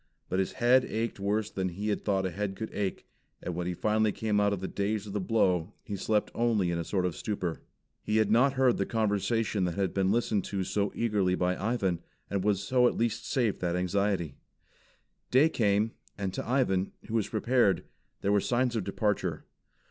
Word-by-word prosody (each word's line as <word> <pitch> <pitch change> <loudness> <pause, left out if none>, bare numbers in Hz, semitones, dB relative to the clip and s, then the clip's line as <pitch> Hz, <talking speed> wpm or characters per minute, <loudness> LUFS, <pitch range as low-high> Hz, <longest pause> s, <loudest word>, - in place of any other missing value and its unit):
But 95 - 0
his 95 - -1
head 125 +1 +4
ached 115 -1 -3
worse 105 +2 0
than 95 -1 -1
he 100 +5 -4
had 105 - -1
thought 95 -2 +1
a 95 - -1
head 100 +1 -3
could 110 +2 -6
ache; 100 -2 -3 0.3
and 90 - -4
when 90 +1 -3
he 90 - -2
finally 110 +3 +2
came 105 0 0
out 105 0 +3
of 100 - -1
the 95 - -4
daze 105 +2 -2
of 100 - -7
the 105 - 0
blow, 90 -3 +1
he 105 - -5
slept 105 +2 0
only 110 -7 +1
in 85 - -1
a - - -1
sort 90 +2 -1
of 90 - -1
stupor. 90 -6 -3 0.4
He 105 - 0
had 110 -1 +3
not 130 +5 +4
heard 130 -2 +3
the 100 - 0
conversation 110 -1 0
that 85 - -2
had 95 -2 0
been 95 -1 +2
listened 110 -3 +1
to 95 -2 -2
so 100 +2 -1
eagerly 105 -5 +1
by 90 0 +1
Ivan, 100 -5 0 0.3
and 100 -1 0 0.2
so 125 +6 +1
was 125 - +6
at - - -8
least 115 0 -1
saved 120 -6 0
that 85 -1 0
anxiety. 90 -3 0 1.0
Day 140 +6 +5
came, 105 -4 +2 0.3
and 95 -2 -3
to 110 - -4
Ivan, 100 -8 +1
who 110 - -7
was 110 -3 +1
prepared, 115 -2 +2 0.4
there 100 - +1
were 100 -1 +4
signs 125 +2 +1
of 110 - 0
departure. 105 +2 -1
105 Hz, 210 wpm, -29 LUFS, 95-115 Hz, 1.0 s, was